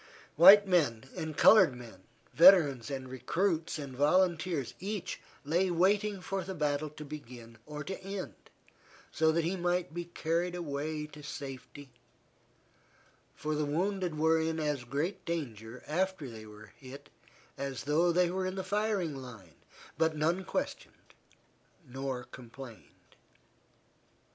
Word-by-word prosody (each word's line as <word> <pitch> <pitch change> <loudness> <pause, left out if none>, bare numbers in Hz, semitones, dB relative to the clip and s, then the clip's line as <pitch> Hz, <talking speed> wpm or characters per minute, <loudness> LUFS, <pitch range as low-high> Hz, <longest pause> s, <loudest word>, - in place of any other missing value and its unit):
White 195 +6 +9
men 140 -10 +1
and 160 -1 -5
colored 185 - +7
men, 115 -6 -12 0.3
veterans 155 -9 +6
and 135 -2 -5
recruits 160 +7 -1
and 140 -4 -7
volunteers, 165 -1 +1
each 200 +1 -4 0.3
lay 175 +6 +1
waiting 195 +3 +1
for 195 +1 -3
the 190 +2 -6
battle 150 -1 -1
to 150 +1 -10
begin 120 -6 -10
or 150 0 -6
to 190 - -6
end 195 0 -5 0.8
so 160 +1 +3
that 165 +1 +1
he 175 +4 -1
might 175 -3 -1
be 175 0 -4
carried 170 +1 -2
away 150 -2 -3
to 150 0 -12
safety, 140 -1 -8 1.4
for 155 +1 -3
the 150 0 0
wounded 180 +2 -1
were 160 +1 +3
in 160 0 -1
as 150 -5 -2
great 160 +9 -3
danger 125 -9 -5
after 180 -1 -1
they 110 -2 -10
were 105 0 -14
hit 135 +1 -12 0.4
as 135 -2 -5
though 160 +4 +2
they 175 0 +2
were 185 0 -2
in 185 - -4
the 190 - -3
firing 200 -5 -1
line, 115 - -11 0.5
but 160 -1 +2
none 170 +5 +1
questioned - - -5 0.7
nor 130 0 -4
complained. 125 -1 -13
155 Hz, 135 wpm, -31 LUFS, 135-180 Hz, 1.4 s, White